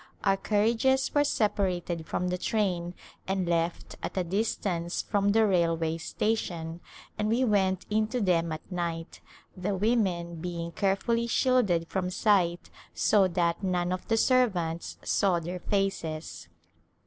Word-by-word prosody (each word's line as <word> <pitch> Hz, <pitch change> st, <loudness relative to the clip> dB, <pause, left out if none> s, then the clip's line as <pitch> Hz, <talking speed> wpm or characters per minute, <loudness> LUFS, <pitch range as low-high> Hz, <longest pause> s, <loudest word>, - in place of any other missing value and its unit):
Our 195 Hz, -1 st, +3 dB
carriages 230 Hz, +7 st, +2 dB
were 290 Hz, -, +4 dB
separated 185 Hz, -, -1 dB
from 180 Hz, +1 st, -1 dB
the 180 Hz, -, -1 dB
train 180 Hz, -5 st, -1 dB, 0.3 s
and 190 Hz, -2 st, -1 dB
left 170 Hz, 0 st, -1 dB
at -, -, -5 dB
a 185 Hz, -, +2 dB
distance 180 Hz, -2 st, -1 dB
from 200 Hz, -1 st, +1 dB
the 220 Hz, +2 st, +4 dB
railway 165 Hz, -4 st, +1 dB
station 170 Hz, -3 st, -2 dB, 0.4 s
and 210 Hz, -, +1 dB
we 235 Hz, +4 st, +2 dB
went 190 Hz, -4 st, +1 dB
into 220 Hz, +4 st, +1 dB
them 170 Hz, -5 st, +1 dB
at 155 Hz, +4 st, -7 dB
night, 170 Hz, -2 st, -4 dB, 0.3 s
the 195 Hz, +2 st, -2 dB
women 185 Hz, -5 st, 0 dB
being 170 Hz, 0 st, -4 dB
carefully 215 Hz, +5 st, 0 dB
shielded 230 Hz, -10 st, +2 dB
from 185 Hz, 0 st, -2 dB
sight 180 Hz, -3 st, +1 dB, 0.2 s
so 200 Hz, -3 st, +4 dB
that 170 Hz, 0 st, 0 dB
none 180 Hz, -2 st, 0 dB
of 185 Hz, 0 st, -4 dB
the 225 Hz, -, +2 dB
servants 190 Hz, -11 st, +1 dB
saw 185 Hz, -4 st, +2 dB
their 175 Hz, +2 st, -5 dB
faces. 170 Hz, -, -2 dB
185 Hz, 135 wpm, -28 LUFS, 170-210 Hz, 0.4 s, were